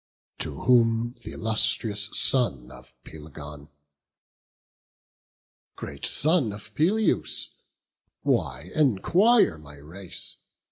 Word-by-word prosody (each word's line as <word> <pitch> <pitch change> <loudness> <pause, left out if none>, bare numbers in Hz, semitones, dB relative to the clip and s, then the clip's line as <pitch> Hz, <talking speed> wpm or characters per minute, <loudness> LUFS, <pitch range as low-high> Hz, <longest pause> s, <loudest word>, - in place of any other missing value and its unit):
To 75 -4 -5
whom 115 -1 +2
th' - - -14
illustrious 110 -1 +1
son 70 - +2
of 60 - -16
Pelegon: 75 -1 -11 2.1
"Great - - -6
son 155 -6 +2
of 105 0 -11
Peleus, 195 - +1 0.7
why 70 +7 -1
enquire 155 - +3
my 75 -1 -13
race? 85 +6 -6
105 Hz, 85 wpm, -25 LUFS, 75-125 Hz, 2.1 s, enquire